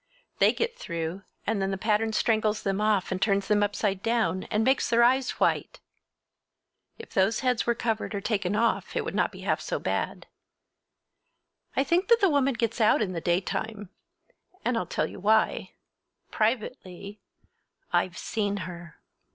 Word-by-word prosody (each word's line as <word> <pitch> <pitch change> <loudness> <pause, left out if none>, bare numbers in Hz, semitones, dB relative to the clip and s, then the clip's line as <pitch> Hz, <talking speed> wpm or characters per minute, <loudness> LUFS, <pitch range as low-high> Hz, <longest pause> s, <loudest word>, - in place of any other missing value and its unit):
They - - +6
get 470 +1 -3
through, 170 - -4 0.2
and 210 -2 0
then 195 - 0
the 195 - -2
pattern 215 +2 +1
strangles 215 -1 +1
them 195 +1 -1
off 210 -4 +1
and 185 0 -2
turns 200 -2 +1
them 210 -1 +3
upside 205 -1 0
down, 225 -5 0
and 215 +1 0
makes 265 +3 +2
their 235 0 +4
eyes 255 +2 +3
white! - - 0 1.2
If 455 - -11
those 195 +4 +2
heads 250 -3 +1
were 235 - +2
covered 225 -2 -2
or - - -1
taken 200 -2 -1
off 230 +2 0
it - - -1
would - - -4
not - - +1
be - - -11
half - - 0
so - - -2
bad. - - -3 1.5
I 270 - +3
think 340 +7 +1
that 465 -4 +5
woman 275 -3 +2
gets 230 0 -1
out 215 0 +4
in 185 -3 -3
the 165 - -3
daytime! 195 +4 -2 0.8
And 245 +1 +1
I'll 185 -6 -1
tell - - 0
you - - -8
why—privately—I've 210 -3 -3
seen 205 -2 -2
her! 175 -3 -8
215 Hz, 160 wpm, -27 LUFS, 195-235 Hz, 1.5 s, They